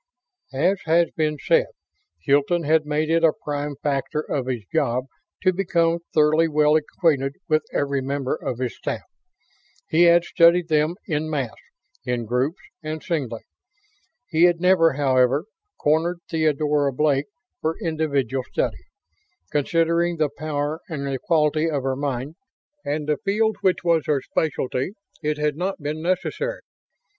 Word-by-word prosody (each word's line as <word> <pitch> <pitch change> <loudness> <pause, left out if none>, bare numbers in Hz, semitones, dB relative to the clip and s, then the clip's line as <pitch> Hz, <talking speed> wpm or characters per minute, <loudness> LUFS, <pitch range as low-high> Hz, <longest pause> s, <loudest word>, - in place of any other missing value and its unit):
As 180 +8 +2
has 165 +1 +3
been 155 -1 0
said, - - +2 0.6
Hilton 145 +5 +2
had 155 0 +2
made 155 +1 0
it 165 0 +2
a 160 -2 +5
prime 145 0 -3
factor 145 +1 -1
of 135 -4 -3
his 125 -4 -2
job 125 +2 +1 0.4
to 185 0 +4
become 170 -2 +1
thoroughly 155 +1 +4
well 150 -1 +3
acquainted 150 -3 +1
with 155 0 +2
every 140 -1 0
member 135 0 -2
of 125 - -4
his 125 -1 -3
staff. - - -4 0.9
He 170 +2 +5
had 170 0 +6
studied 170 0 +4
them 155 +2 +2
en 155 0 -1
masse, 135 -7 -2 0.5
in 120 -2 -2
groups 125 - 0 0.2
and 155 0 -5
singly. 130 -9 -2 0.9
He 165 0 +4
had 175 -1 +3
never, 180 -3 +4
however, 135 +1 +2 0.3
cornered 165 +4 +1
Theodora 150 -3 +1
Blake 145 0 +1 0.3
for 160 +1 -1
individual 140 - -1
study. - - -2 0.7
Considering 170 +3 +1
the 155 -2 +1
power 150 0 -2
and 145 -4 -4
the 135 -1 -2
quality 160 -4 +2
of 145 -4 -2
her 135 0 0
mind, 140 0 -3 0.5
and 150 +1 -2
the 150 -1 +1
field 215 +2 0
which 185 -2 +1
was 165 -3 +2
her 150 -2 +2
specialty, 135 +1 -1 0.3
it 150 0 -1
had 150 -1 0
not 185 +4 -3
been 150 +1 -4
necessary. 325 - -2
155 Hz, 145 wpm, -23 LUFS, 140-165 Hz, 0.9 s, had